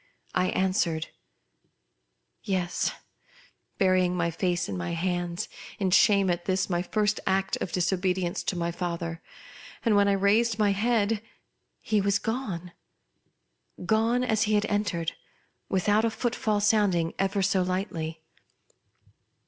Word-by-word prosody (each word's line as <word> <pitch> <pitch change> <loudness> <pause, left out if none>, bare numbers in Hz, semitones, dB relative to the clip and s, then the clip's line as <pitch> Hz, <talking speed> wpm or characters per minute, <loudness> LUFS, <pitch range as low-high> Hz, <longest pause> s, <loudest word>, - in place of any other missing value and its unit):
I 180 0 +2
answered, 185 -5 0 1.3
"yes," 180 -3 -1 0.9
burying 185 -2 +3
my 170 -1 0
face 175 +1 -1
in 100 - -4
my 90 - -3
hands, 175 0 -2 0.3
in 190 -2 0
shame 200 -1 +5
at 175 0 -3
this 190 0 0
ray 175 0 +1
first 210 +3 0
act 190 0 +1
of - - -4
dis 180 +1 +1
obedience 180 -1 -1
to - - -1
my 170 -1 -1
father; 170 -1 -4 0.6
and, 225 -3 +4
when 200 0 +4
I 200 - +3
raised 210 +3 +2
my 210 -2 +3
head, 215 0 +1 0.6
he 215 -2 +1
was 200 0 +2
gone. 200 -6 -4 1.1
Gone 225 +4 +2
as 220 -2 +2
he 215 - +3
had 205 0 +2
entered, 205 -6 -1 0.6
without 205 +3 +2
a 230 - +3
footfall 220 -2 -1
sounding 200 -6 +2
ever 195 0 +1
so 190 0 +2
lightly. 170 -4 -3
190 Hz, 130 wpm, -27 LUFS, 175-210 Hz, 1.3 s, shame